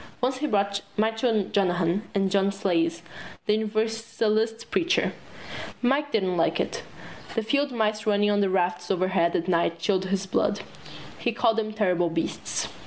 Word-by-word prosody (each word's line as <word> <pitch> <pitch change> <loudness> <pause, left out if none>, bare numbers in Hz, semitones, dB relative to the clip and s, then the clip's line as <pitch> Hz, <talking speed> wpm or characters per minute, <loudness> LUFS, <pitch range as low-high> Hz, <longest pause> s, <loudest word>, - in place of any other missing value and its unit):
Once 255 +1 0
he 300 +3 -1
brought 200 -4 +1 0.2
Michael 220 -1 +1
Monahan 180 -1 +2
and 195 -1 +2
John 195 0 +3
Sayles 170 -4 0 0.4
the 210 - +3
Universalist 220 +1 -1
preacher. 350 +1 +2 0.7
Mike 285 +4 +2
didn't 190 -5 +1
like 165 - +2
it. - - -2 0.5
The 225 - 0
field 280 +5 +1
mice 215 -2 0
running 205 0 +3
on 205 - +2
the 195 - +2
rafters 180 -1 0
overhead 185 -2 +2
at 170 - 0
night 170 -1 +1
chilled 190 +2 0
his 195 0 -1
blood. 190 - 0 0.6
He 240 - 0
called 230 -1 +2
them 215 -1 -1
terrible 180 -5 +1
beasts. 165 0 -2
205 Hz, 155 wpm, -26 LUFS, 185-225 Hz, 0.7 s, John